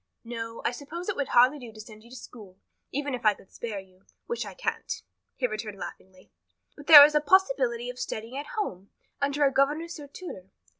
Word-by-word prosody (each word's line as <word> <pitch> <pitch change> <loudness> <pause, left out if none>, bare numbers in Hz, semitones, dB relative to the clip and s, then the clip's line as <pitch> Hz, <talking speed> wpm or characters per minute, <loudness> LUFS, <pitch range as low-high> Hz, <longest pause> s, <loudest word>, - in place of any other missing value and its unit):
"No, 230 -1 -6
I - - +2
suppose 310 +9 -7
it 410 - -1
would 280 - -2
hardly 255 +5 +4
do 240 -3 -10
to 215 - -15
send 215 0 -12
you 235 - -17
to 250 - -11
school, 210 -6 -12 0.3
even 285 0 -3
if 245 - -4
I 210 -2 +4
could 190 - -21
spare 225 -3 -6
you 190 0 -18 0.2
which 475 - -4
I - - -9
can't," - - -3 0.4
he 260 - -1
returned 215 -3 -4
laughingly, 185 +1 -11 0.4
"but 290 - -13
there 290 -3 +12
is 300 - +1
a 300 - +3
possibility 270 -8 +2
of 250 0 -7
studying 225 +4 -5
at 290 - -6
home, 195 - -4 0.3
under 280 +1 +1
a 275 - +2
governess 305 +5 0
or 290 - -9
tutor. 275 - -10
250 Hz, 210 wpm, -27 LUFS, 215-290 Hz, 0.4 s, there